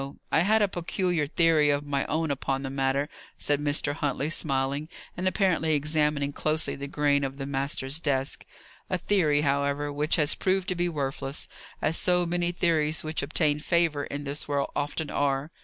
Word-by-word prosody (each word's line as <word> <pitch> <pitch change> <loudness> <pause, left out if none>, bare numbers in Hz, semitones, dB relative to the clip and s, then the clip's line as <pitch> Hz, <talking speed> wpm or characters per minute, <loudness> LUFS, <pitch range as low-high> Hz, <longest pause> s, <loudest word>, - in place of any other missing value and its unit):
I - - +4
had 210 +5 +4
a - - +4
peculiar 175 -3 -1
theory 160 -2 +3
of 145 0 +1
my 140 -1 -1
own 160 0 0
upon 135 0 -2
the 135 - -4
matter," 135 +1 0 0.3
said 145 -1 +1
Mr. 145 0 +1
Huntley, 145 +1 -2
smiling, 140 0 -1 0.3
and 185 +1 -1
apparently 180 -5 +2
examining 150 -1 0
closely 155 +2 0
the 140 +1 -6
grain 145 0 +1
of 135 0 -3
the 135 - -4
master's 135 +1 -2
desk. 135 -3 -1 0.5
"A 185 - +1
theory, 170 -6 +2
however, 140 0 0
which 150 +2 +1
has 150 -2 +3
proved 190 0 0
to 185 - 0
be 175 0 0
worthless; 140 -2 -3 0.4
as 160 - +3
so 180 -1 +3
many 175 0 0
theories 160 -3 +1
which 155 0 -2
obtain 150 0 +1
favour 160 -3 +1
in 145 +1 -5
this 140 +1 -2
world 140 -1 -1
often 145 +1 -2
are. 140 +2 0
150 Hz, 175 wpm, -27 LUFS, 140-165 Hz, 0.5 s, I